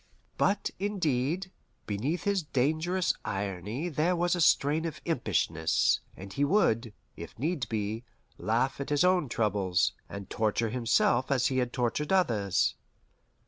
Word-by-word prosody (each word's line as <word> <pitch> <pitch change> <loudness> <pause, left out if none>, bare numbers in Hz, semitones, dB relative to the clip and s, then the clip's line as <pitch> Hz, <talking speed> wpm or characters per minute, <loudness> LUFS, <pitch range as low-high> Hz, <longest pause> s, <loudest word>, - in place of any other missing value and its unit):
But, 200 0 +1
indeed, 185 -3 -1 0.3
beneath 135 - -2
his 200 -2 +1
dangerous 160 +6 0
irony 100 - -3
there 170 +3 +1
was 175 +1 +1
a 175 - -1
strain 155 0 +3
of 160 -2 -4
impishness, 85 - +1 0.2
and 95 +1 -9
he 140 - 0
would, 125 - +2 0.2
if - - -9
need 145 -3 -2
be, 110 +1 -2 0.4
laugh 115 +8 0
at 140 - -4
his 145 +1 +2
own 180 -6 +3
troubles, 100 -6 +1 0.2
and 100 -1 -7
torture 110 0 0
himself 120 +1 +2
as 130 -2 +2
he 130 - +1
had 125 -1 -1
tortured 125 +6 -1
others. 110 - +2
130 Hz, 140 wpm, -29 LUFS, 110-165 Hz, 0.4 s, strain